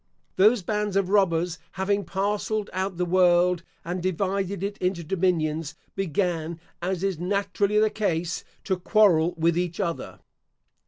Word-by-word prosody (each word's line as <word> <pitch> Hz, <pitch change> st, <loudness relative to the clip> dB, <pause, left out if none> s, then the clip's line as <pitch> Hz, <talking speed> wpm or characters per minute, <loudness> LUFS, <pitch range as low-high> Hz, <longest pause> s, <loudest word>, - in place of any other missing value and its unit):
Those 210 Hz, +2 st, +4 dB
bands 210 Hz, +1 st, -1 dB
of 195 Hz, -2 st, +1 dB
robbers 175 Hz, -4 st, +2 dB
having 200 Hz, +1 st, 0 dB
parcelled 205 Hz, +3 st, -1 dB
out 190 Hz, 0 st, -2 dB
the 180 Hz, -, 0 dB
world, 180 Hz, -1 st, +4 dB, 0.2 s
and 175 Hz, +2 st, -3 dB
divided 190 Hz, +1 st, -1 dB
it 200 Hz, +1 st, -3 dB
into 180 Hz, -2 st, -1 dB
dominions, 165 Hz, -3 st, 0 dB, 0.2 s
began, 170 Hz, -3 st, -1 dB, 0.2 s
as 185 Hz, +1 st, -2 dB
is 195 Hz, -5 st, -1 dB
naturally 200 Hz, +2 st, 0 dB
the 215 Hz, 0 st, +4 dB
case, 175 Hz, -6 st, -1 dB, 0.2 s
to 190 Hz, -2 st, 0 dB
quarrel 180 Hz, -5 st, +4 dB
with 165 Hz, +1 st, +2 dB
each 175 Hz, -1 st, -2 dB
other. 170 Hz, -4 st, -3 dB
185 Hz, 140 wpm, -25 LUFS, 170-200 Hz, 0.2 s, Those